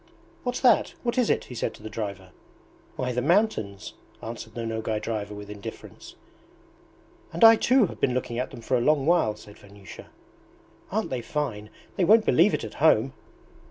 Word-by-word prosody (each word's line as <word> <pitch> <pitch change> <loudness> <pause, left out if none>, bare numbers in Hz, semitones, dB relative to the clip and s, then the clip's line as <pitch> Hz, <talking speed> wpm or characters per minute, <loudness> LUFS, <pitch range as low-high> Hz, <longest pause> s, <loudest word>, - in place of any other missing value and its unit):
"What's 245 0 -3
that! 255 - +3
What 240 +1 0
is 245 - +2
it?" - - +1
he - - -11
said 120 - -3
to - - -16
the - - -6
driver. 100 -4 -6 0.6
"Why, 125 -1 -2
the 125 0 -1
mountains," 145 - 0 0.3
answered 110 -1 -8
the 115 -1 -4
Nogay 110 -1 -2
driver 105 -1 -4
with 105 0 -9
indifference. 105 -1 -10 1.2
"And 170 - -1
I 225 0 +10
too 250 +1 +3
have - - -9
been 125 - +1
looking 120 -2 -3
at 125 - -2
them 120 -4 -11
for 130 - -1
a 120 - +1
long 145 +1 +2
while," 165 -10 +2
said 105 0 -15
Vanyusha. 100 -1 -13 0.8
"Aren't 220 +3 -2
they 130 -2 -2
fine? 115 -7 -4 0.3
They 190 - +2
won't 215 +5 +5
believe 180 +6 +4
it - - -5
at - - -7
home." - - +4
120 Hz, 185 wpm, -26 LUFS, 105-175 Hz, 1.2 s, I